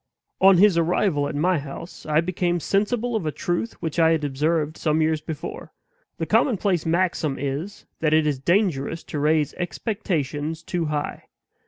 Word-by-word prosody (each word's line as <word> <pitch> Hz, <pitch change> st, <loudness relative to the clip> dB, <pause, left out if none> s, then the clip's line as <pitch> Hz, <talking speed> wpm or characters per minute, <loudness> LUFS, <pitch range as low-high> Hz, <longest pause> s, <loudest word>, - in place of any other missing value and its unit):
On 190 Hz, -1 st, +7 dB
his 190 Hz, -2 st, +5 dB
arrival 165 Hz, -3 st, +1 dB
at 145 Hz, -, -5 dB
my 175 Hz, +3 st, +2 dB
house, 145 Hz, +6 st, -9 dB
I 155 Hz, +1 st, +3 dB
became 175 Hz, 0 st, -1 dB
sensible 220 Hz, +7 st, 0 dB
of 190 Hz, -8 st, -1 dB
a -, -, 0 dB
truth 175 Hz, +9 st, -2 dB
which 160 Hz, +1 st, -2 dB
I 165 Hz, 0 st, +5 dB
had 160 Hz, -2 st, -1 dB
observed 150 Hz, +2 st, 0 dB
some 155 Hz, -1 st, 0 dB
years 155 Hz, -1 st, +1 dB
before. 155 Hz, +1 st, -7 dB, 0.4 s
The -, -, -2 dB
commonplace 195 Hz, -, +1 dB
maxim 165 Hz, -4 st, 0 dB
is, 145 Hz, +9 st, -4 dB
that 155 Hz, -1 st, +1 dB
it 155 Hz, 0 st, +4 dB
is 145 Hz, -3 st, 0 dB
dangerous 165 Hz, -2 st, 0 dB
to 150 Hz, -, -5 dB
raise 150 Hz, 0 st, +2 dB
expectations 165 Hz, -, -3 dB
too 175 Hz, -2 st, -2 dB
high. 150 Hz, -1 st, -3 dB
160 Hz, 165 wpm, -24 LUFS, 150-180 Hz, 0.4 s, On